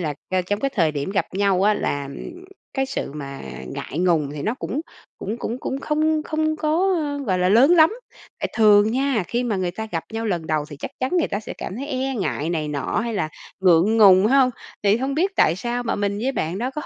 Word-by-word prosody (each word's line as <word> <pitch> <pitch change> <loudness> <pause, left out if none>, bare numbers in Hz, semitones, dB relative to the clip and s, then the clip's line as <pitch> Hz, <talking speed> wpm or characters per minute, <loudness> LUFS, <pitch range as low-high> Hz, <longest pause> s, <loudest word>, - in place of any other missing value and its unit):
là, 150 -4 -2 0.2
a, 185 -1 +1
trong 205 +3 -2
cái 275 - 0
thời 165 -7 +2
điểm 145 +4 -3
gặp 200 0 0
nhau 195 -1 +2
á 210 +1 +4
là, 145 -6 -2
ừm, 350 - -9 0.3
cái 270 -1 0
sự 140 - -4
mà 140 -2 -7 0.3
ngại 145 - -6
ngùng 165 -6 +2
thì 145 - -5
nó 220 +8 -1
cũng 280 +3 -4 0.4
cũng 215 +4 -4
cũng 240 +1 -4
cũng 265 - -3
không 310 0 +1
không 310 0 -1
có, 335 +5 +1
ơ, 290 -3 -2
gọi 185 -2 +1
là, 180 0 +2
lớn 235 - +6
lắm. 325 0 +6 0.5
Tại - - -2
thường 210 -1 +6
nha, 260 -6 +1
khi 240 +1 -1
mà 220 -4 -1
người 185 -2 -1
ta 220 +5 -6
gặp 165 - -2
nhau 225 0 -3
lần 175 -5 -2
đầu 155 -2 0
thì 145 - -8
chắc - - -6
chắn 255 - 0
người 335 - +1
ta 205 - -2
sẽ - - -8
cảm 195 - -5
thấy 275 - -5
e 265 -1 -2
ngại 155 - -2
này 155 -3 -2
nọ 145 +7 -1
hay 235 -1 -3
là 155 - -1 0.3
ngượng 185 +4 +4
ngùng, 195 -2 +7
phải 220 - +3
không? 270 -2 +5 0.3
Thì 205 +1 +4
hông 265 +3 -2
biết 370 +7 +1
tại 160 - +4
sao 240 +4 -2
mà 235 - -1
mình 200 0 -1
với 255 +5 -1
bạn 175 -6 -2
đó 245 +4 -2
có 300 +3 -5
210 Hz, 250 wpm, -22 LUFS, 175-270 Hz, 0.5 s, ngùng